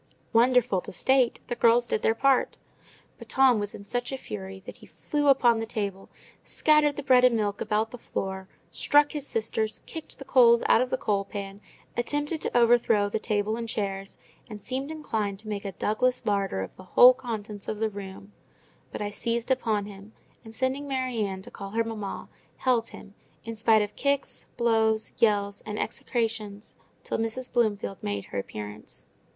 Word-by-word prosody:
Wonderful 240 -4 +4
to - - -9
state, 260 +3 +2
the 245 - -2
girls 240 0 +4
did 215 - -1
their 225 - +2
part; 270 +2 +2 0.6
but - - -12
Tom 265 -4 +4
was 205 0 -4
in 200 - -10
such 245 +5 -2
a 270 - -3
fury 190 -5 -8
that - - -9
he - - -16
flew 295 -1 -2
upon 240 -4 +5
the 225 - -4
table, 200 -4 -4 0.3
scattered 300 -2 +3
the 290 - -5
bread 255 -2 +5
and 250 -2 +5
milk 205 -2 -1
about 215 +1 0
the 245 - -9
floor, 190 -3 -4 0.2
struck 290 0 +3
his 290 -2 -5
sisters, 220 -1 -2
kicked 320 -2 -8
the 275 - -10
coals 235 -3 +5
out - - +5
of 255 - -1
the 260 - 0
coal 205 -5 0
pan, 200 0 -7 0.4
attempted 290 +6 -1
to - - -1
overthrow 230 -3 +4
the 220 - -2
table 215 0 0
and 230 0 -5
chairs, 195 -2 -3 0.3
and 210 -2 -7
seemed 265 +2 -3
inclined 220 -11 -3
to 215 +2 -14
make 205 -1 -4
a 195 - -3
Douglas 235 +6 0
larder 195 - 0
of 95 - -9
the 185 - -11
whole 250 +1 +10
contents 220 -5 -6
of 215 - -3
the 220 +1 0
room: 195 0 -9 0.6
but - - -4
I 205 - -3
seized 230 +4 -2
upon 220 -5 +1
him, 200 +1 -12 0.3
and, 225 -1 -12
sending 265 +4 -1
Mary 255 -3 -2
Ann 190 -2 -4
to - - -11
call 200 -1 -8
her 230 +3 0
mamma, 215 -3 -5 0.3
held 240 -3 +1
him, 200 - -12 0.3
in 230 0 -5
spite 220 -1 +4
of 205 - -7
kicks, 280 0 -1
blows, 220 -2 +2
yells, 205 -2 +2
and 210 -1 -6
execrations, 220 -4 -3 0.3
till - - -3
Mrs. 225 +3 -3
Bloomfield 210 -5 0
made 100 -1 -3
her 100 - -4
appearance. 105 +1 -8
225 Hz, 185 wpm, -27 LUFS, 205-250 Hz, 0.6 s, whole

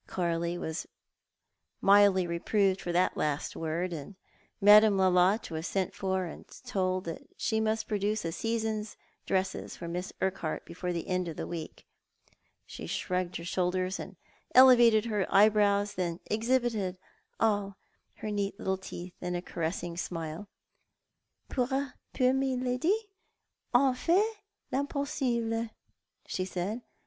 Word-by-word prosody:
Coralie 170 -1 -1
was 160 -1 -4 0.9
mildly 200 -2 +5
reproved 190 +3 +1
for 175 - -3
that 180 +1 +2
last 150 -1 -1
word, 170 +3 -2
and 160 +5 -7 0.4
Madame 210 0 +7
Lolotte 185 +2 +3
was 160 +1 -3
sent 190 -1 -1
for 190 -2 -1
and 170 - -8 0.2
told 185 -5 0
that 165 -2 -5 0.2
she 220 - 0
must 220 0 0
produce 210 -1 -1
a 165 - -1
season's 220 +1 -2 0.3
dresses 190 0 -1
for 170 - -6
^liss 180 +2 -4
Urquhart 190 -4 -2
before 180 +1 -4
the 170 -1 -3
end 185 -1 0
of 165 - -6
the - - -3
week. 165 -2 -7 0.8
She - - -8
shrugged 180 -1 -2
her 170 - -4
shoulders 185 +2 0
and - - -7 0.4
elevated 240 -4 +7
her 210 -4 0
eyebrows, 205 0 +4
and 175 -2 -1
then - - -29
exhibited 225 -4 0 0.4
all 205 -3 +1 0.4
her 215 - -5
neat 200 -1 -2
little 190 -2 -1
teeth 180 -1 -8
in 180 0 -2
a 175 - -2
caressing 170 0 -3
smile. 165 +2 -5 0.6
" - - -52
Pour 250 -2 0 0.5
Miladi 260 - +2 0.7
on 260 +1 +4
fait 405 - +1 0.3
riinpossible," 255 -5 -1 0.6
she 185 - -2
said. 190 +5 -3
195 Hz, 135 wpm, -30 LUFS, 180-220 Hz, 0.9 s, Madame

